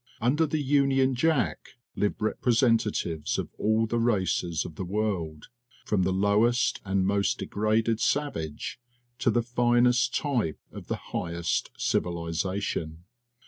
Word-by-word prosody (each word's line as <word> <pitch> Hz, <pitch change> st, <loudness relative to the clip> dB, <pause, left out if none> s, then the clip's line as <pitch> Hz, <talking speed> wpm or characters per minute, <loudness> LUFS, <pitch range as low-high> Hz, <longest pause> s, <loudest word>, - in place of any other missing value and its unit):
Under 140 Hz, +7 st, +2 dB
the 155 Hz, +1 st, -1 dB
Union 135 Hz, -1 st, +3 dB
Jack 140 Hz, -1 st, 0 dB, 0.2 s
live 105 Hz, -, 0 dB
repre 110 Hz, -, -1 dB, 0.2 s
sentatives 110 Hz, -, +1 dB
of -, -, -3 dB
all 110 Hz, +1 st, +2 dB
the 115 Hz, +1 st, -1 dB
races 95 Hz, -7 st, 0 dB
of 85 Hz, -, -7 dB
the 95 Hz, -, -5 dB
world, 90 Hz, -6 st, -3 dB, 0.4 s
from 105 Hz, -3 st, +1 dB
the 95 Hz, +1 st, +1 dB
lowest 105 Hz, +6 st, +2 dB
and 95 Hz, -1 st, 0 dB
most 100 Hz, 0 st, +1 dB
degraded 110 Hz, +2 st, 0 dB
savage 120 Hz, -, -2 dB, 0.4 s
to -, -, +2 dB
the 120 Hz, -, +2 dB
finest 120 Hz, +1 st, +2 dB
type 120 Hz, -, 0 dB
of -, -, -10 dB
the -, -, -6 dB
highest 85 Hz, -1 st, -2 dB
civilization. 85 Hz, -1 st, -2 dB
110 Hz, 130 wpm, -27 LUFS, 90-120 Hz, 0.4 s, Union